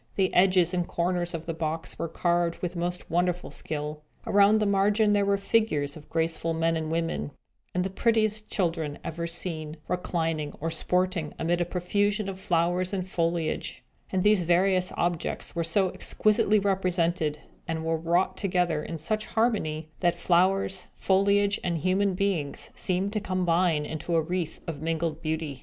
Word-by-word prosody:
The 190 -2 +1
edges 185 -1 +4
and 175 -1 0
corners 175 0 -1
of 165 0 -6
the 165 - -3
box 160 0 -4
were 165 - -1
carved 170 +1 0
with 180 0 -4
most 175 0 -3
wonderful 175 +1 0
skill. 150 0 -5 0.2
Around 205 +1 +5
the 215 - +1
margin 205 +2 +3
there 200 -1 +2
were 200 0 +3
figures 195 -9 +1
of 155 -1 -13
graceful 165 0 -1
men 165 0 +1
and 160 -1 -3
women, 165 - -1 0.5
and 180 - +2
the 190 - -3
prettiest 215 0 +1
children 165 -6 -1
ever 170 +1 -4
seen, 165 -2 -2
reclining 165 -4 -1
or 165 +2 -2
sporting 180 -1 0
amid 175 +1 0
a - - +2
profusion 205 +4 0
of 190 -1 -6
flowers 175 +1 +1
and 185 -2 -2
foliage; 165 -3 -2 0.3
and 185 -1 +1
these 210 -2 +5
various 180 +2 +3
objects 175 -1 -2
were 170 - 0
so 185 +3 +2
exquisitely 215 0 +3
represented, 180 -6 +1 0.3
and 160 -1 -3
were 165 0 +1
wrought 170 +3 +1
together 180 -5 0
in 165 +2 -5
such 215 +7 -1
harmony, 165 -9 0
that 175 -2 +2
flowers, 185 +1 +2
foliage, 200 +1 +2
and 175 -2 0
human 185 +4 +1
beings 180 -7 -1
seemed 190 +2 -1
to 215 - 0
combine 180 -5 +1
into 160 +3 -3
a 165 - +4
wreath 175 -1 -3
of 155 -3 -5
mingled 165 -1 -2
beauty. 155 -4 -3
175 Hz, 165 wpm, -27 LUFS, 165-190 Hz, 0.5 s, Around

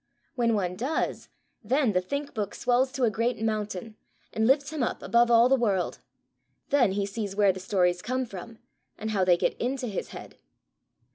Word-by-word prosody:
When 235 -2 +1
one 180 -3 -1
does, 270 +7 -2 0.3
then 255 +2 +2
the 180 -2 +1
Think 280 +9 -4
book 205 -3 -3
swells 255 +2 +1
to 265 - -2
a 230 - +3
great 230 +2 -1
mountain 215 -1 -3 0.4
and 220 0 +1
lifts 280 +2 +3
him 305 - -2
up 245 - -2
above 235 0 +3
all 235 0 +6
the 270 - +4
world: 205 -8 0 0.7
then 255 -9 +3
he 200 0 0
sees 200 -1 -4
where 200 -2 +4
the 190 - -7
stories 180 -2 +1
come 255 +4 -2
from, 225 +2 -9 0.4
and 220 +1 -4
how 195 -3 +1
they 180 -1 +4
get - - +1
into 255 +1 -1
his 210 -5 -4
head. - - -11
225 Hz, 190 wpm, -27 LUFS, 200-250 Hz, 0.7 s, all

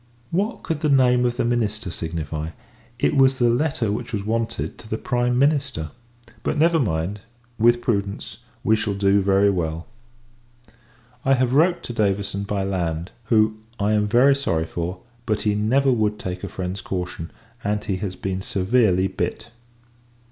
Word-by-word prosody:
What 205 +7 -1
could 160 -2 -2
the 155 -1 0
name 125 -3 +4
of 120 - -3
the - - +1
minister 110 -5 -1
signify! 80 -2 -4 0.5
It 120 - +1
was 135 -1 +5
the 120 -2 +3
letter 125 -4 0
which 115 +3 -4
was 105 -4 -2
wanted 115 +1 -2
to 110 - -13
the 110 - -1
Prime 125 +1 0
Minister. 135 - +1 0.5
But, 150 - -1
never 165 +2 +4
mind; 95 - -1 0.4
with 120 +1 +4
prudence, 100 0 -2 0.2
we 110 - +4
shall 110 -2 -2
do 100 0 +3
very 100 +1 +4
well. 80 -3 -2 1.4
I 135 0 +4
have 130 -1 +1
wrote 170 +5 +3
to 120 - -5
Davison, 100 -2 0
by 100 -1 -1
land: 85 -3 -2
who, 110 -1 +3 0.2
I 105 +1 +1
am 105 -1 +2
very 125 +6 +5
sorry 85 -13 0
for; 85 +3 -4 0.3
but, 105 -2 0
he 105 - +2
never 130 +7 +2
would 105 -3 +1
take 90 -2 -5
a - - -4
friend's 95 +1 -4
caution, 90 -3 -4 0.3
and 105 0 -1
he 100 -3 -2
has 95 -1 -4
been 95 -1 -3
severely 95 -1 +2
bit. 95 - -3
105 Hz, 165 wpm, -23 LUFS, 95-125 Hz, 1.4 s, was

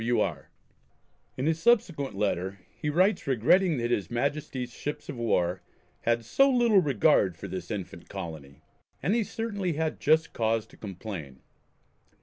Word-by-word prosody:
W. 120 0 +2
R. 80 -10 -2 0.9
In 130 +3 -1
a 160 - +4
subsequent 165 - +2
letter 95 -1 -1 0.2
he 150 - -3
writes 185 +4 +2
regretting 150 - +3
that 120 0 -1
his 100 -7 0
Majesty's 130 -1 -2
ships 150 +4 -5
of 145 - -4
war 90 -6 +1 0.4
have 115 0 +1
"so 275 - +4
little 240 -5 +5
regard 100 - +3
for - - -7
this 90 -2 -6
infant 95 -5 -6
colony," 80 -8 -8 0.4
and 195 - +2
he 230 -1 +2
certainly 200 -5 -3
had 160 +1 -2
just 160 +2 +3
cause 110 -1 0
to - - -19
complain. 90 -9 -7
120 Hz, 150 wpm, -28 LUFS, 95-160 Hz, 0.9 s, little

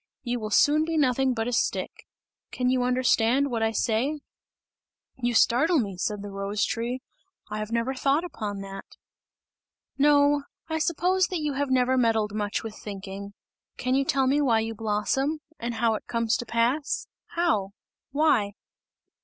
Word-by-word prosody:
You 245 -1 -2
will 215 -1 -4
soon 295 +8 +4
be 325 0 -1
nothing 260 -2 +2
but 225 0 -1
a 245 - -2
stick! - - -1 0.4
Can 250 0 0
you 255 -1 +2
understand 250 +1 +2
what 230 -2 -1
I 225 - +3
say?" 245 +7 0 1.0
"You 240 -1 0
startle 315 +10 +4
me," 200 -8 -1
said 205 +3 -3
the 205 - -7
rose 195 +1 -1
tree, 245 +3 -3 0.5
"I 210 - -3
have 215 +1 -5
never 235 +3 0
thought 275 +4 +1
upon 210 - -5
that!" 195 0 -7 1.2
"No, 290 0 +5 0.3
I 320 -1 -2
suppose 360 +4 +2
that 360 -4 -3
you 300 -1 -1
have 280 0 -1
never 260 0 +3
meddled 220 -3 +2
much 210 0 -2
with 220 -1 -6
thinking! 200 0 -7 0.4
Can 255 +1 -1
you 275 +1 +3
tell 270 -1 +1
me 280 +3 +3
why 230 -6 +3
you 225 0 -3
blossom? 225 +8 -1 0.2
And 235 0 -3
how 225 0 +2
it 215 - -5
comes 230 -1 +1
to 240 - -6
pass? 245 +6 0 0.3
How? 325 - +1 0.4
Why?" 270 -9 +2
245 Hz, 165 wpm, -26 LUFS, 220-285 Hz, 1.2 s, No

